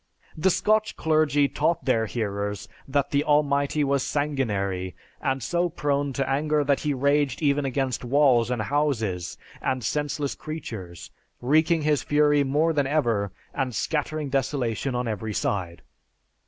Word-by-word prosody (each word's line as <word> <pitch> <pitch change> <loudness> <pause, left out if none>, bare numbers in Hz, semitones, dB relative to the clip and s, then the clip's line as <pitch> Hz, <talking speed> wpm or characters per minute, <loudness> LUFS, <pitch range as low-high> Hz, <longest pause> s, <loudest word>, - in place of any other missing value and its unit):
"The 160 +5 +2
Scotch 215 +3 +1
clergy 155 -2 +2
taught 170 +4 0
their 115 -4 +2
hearers 100 -2 -3 0.2
that 140 0 0
the 145 0 +2
Almighty 145 0 +2
was 140 -1 +1
sanguinary, 100 - -1 0.3
and 135 -2 -1
so 175 +6 0
prone 145 -3 -1
to 135 +1 -1
anger 150 +2 +1
that 140 -1 +2
he 150 - -1
raged 140 +1 +1
even 140 -1 +2
against 130 -2 -1
walls 125 -3 +3
and 120 -3 -1
houses, 110 - -1 0.2
and 130 -2 -1
senseless 145 0 -1
creatures, 110 - -7 0.3
wreaking 155 +5 +2
his 150 -2 +2
fury 145 -1 +3
more 150 +4 +1
than 145 -3 +1
ever, 115 -9 +1 0.2
and 130 -4 -2
scattering 150 -1 -2
desolation 135 -2 -1
on 125 0 -1
every 110 -1 -3
side. 90 -4 -2
140 Hz, 140 wpm, -25 LUFS, 120-150 Hz, 0.3 s, walls